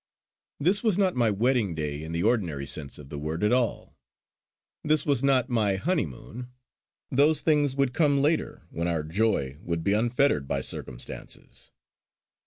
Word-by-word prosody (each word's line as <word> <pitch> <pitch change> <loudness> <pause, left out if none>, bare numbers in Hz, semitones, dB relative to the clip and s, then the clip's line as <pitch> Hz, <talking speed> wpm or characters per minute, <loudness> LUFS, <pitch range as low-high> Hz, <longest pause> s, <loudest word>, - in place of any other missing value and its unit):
This 185 +8 +2
was 215 -5 +2
not 190 -3 +2
my 120 -2 +3
wedding 110 -3 +1
day 75 -2 -3
in 80 +1 -7
the 85 +1 -1
ordinary 90 - 0
sense 70 -1 -3
of 70 -2 -12
the 75 - -6
word 80 +5 -3
at 105 +3 +3
all. 125 -3 -1 0.9
This 155 0 +2
was 140 -4 +1
not 135 -3 +3
my 110 -6 +1
honeymoon. 120 - -3 0.6
Those 145 +4 +3
things 145 -4 +2
would 135 -2 +1
come 145 -2 +3
later, 150 +3 0
when 85 +1 -2
our 80 -3 0
joy 80 -6 0
would 85 -1 -3
be 100 - +2
unfettered 115 - +2
by 70 -1 -1
circumstances. 60 -1 -7
110 Hz, 160 wpm, -27 LUFS, -, 0.9 s, my